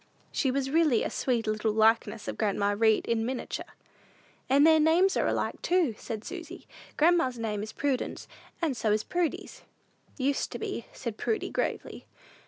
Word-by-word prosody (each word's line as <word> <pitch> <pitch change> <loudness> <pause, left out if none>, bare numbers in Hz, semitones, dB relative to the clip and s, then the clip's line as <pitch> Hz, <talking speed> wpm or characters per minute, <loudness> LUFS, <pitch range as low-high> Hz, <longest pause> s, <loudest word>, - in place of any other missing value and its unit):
She 270 - 0
was 270 +1 -1
really 305 -7 +3
a - - -3
sweet 240 -3 0
little 215 0 0
likeness 220 0 +2
of - - -3
grandma 205 -1 0
Read 220 0 +3
in 230 -1 0
miniature. 250 +2 -5 0.7
"And 280 +3 +5
their 320 -1 +6
names 335 +5 +4
are - - +1
alike, - - -2
too," 345 -9 +2
said 220 0 -6
Susy: 350 -1 -8 0.3
"grandma's 310 -6 +3
name 215 -3 -2
is 215 +1 -6
Prudence, 275 0 -2 0.4
and 300 -5 +1
so 220 -3 0
is 215 0 +1
Prudy's." 350 -3 -3 0.6
"Used 275 0 0
to - - -3
be," 235 - -5
said 235 -4 -6
Prudy, 435 - -2
gravely. - - -3
255 Hz, 165 wpm, -28 LUFS, 220-315 Hz, 0.7 s, their